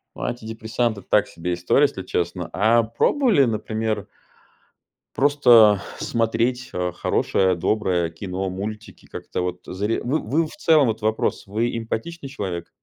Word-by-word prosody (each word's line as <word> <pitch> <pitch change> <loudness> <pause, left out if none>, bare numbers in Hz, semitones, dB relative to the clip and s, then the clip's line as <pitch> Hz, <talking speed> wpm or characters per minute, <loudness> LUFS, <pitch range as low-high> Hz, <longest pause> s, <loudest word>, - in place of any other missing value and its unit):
Ну, - - -7
антидепрессанты- 110 -1 -2
так 105 -1 +3
себе 90 +1 -4
история, 90 +11 +2
если 140 -10 0
честно. 90 -1 -3
А 115 +4 +3
пробовали, 195 - +2
например 110 -2 -2 1.1
просто 120 -8 +5 0.2
смотреть, 115 +2 -1
э, 90 0 -1
хорошее, 95 +1 +1
доброе 90 -2 0
кино, 95 +2 -4
мультики, 105 +3 -7
как-то - - -5
вот 90 0 -3
заре 105 +4 -2
Вы 140 +6 0
вы 155 +9 0
в - - -10
целом, 160 -8 +4
вот 110 0 -2
вопрос: 110 +1 0
вы 115 +4 -1
эмпатичный 135 +7 -5
человек? 95 -10 -5
110 Hz, 135 wpm, -22 LUFS, 95-120 Hz, 1.1 s, просто